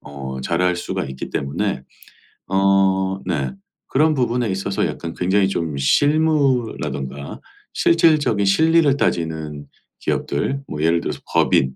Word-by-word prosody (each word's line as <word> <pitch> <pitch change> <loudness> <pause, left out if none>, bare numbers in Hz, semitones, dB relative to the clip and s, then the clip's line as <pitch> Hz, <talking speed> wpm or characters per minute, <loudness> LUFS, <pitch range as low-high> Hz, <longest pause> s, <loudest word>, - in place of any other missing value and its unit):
어 65 -2 -7
잘할 90 +1 +1
수가 90 - -3
있기 65 0 -7
때문에 70 0 -2 0.7
어 95 0 +2
네 - - -1 0.4
그런 155 +3 +2
부분에 120 -3 0
있어서 95 +1 -1
약간 85 -1 -6
굉장히 95 +2 +2
좀 80 -6 -2
실무라든가 120 - 0 0.3
실질적인 155 -11 +3
실리를 155 +7 +4
따지는 80 - -2 0.3
기업들 135 - -2
뭐 75 -1 -5
예를 85 +1 +3
들어서 - - -4
법인 65 -1 +2
95 Hz, 265 characters per minute, -20 LUFS, -, 0.7 s, 실리를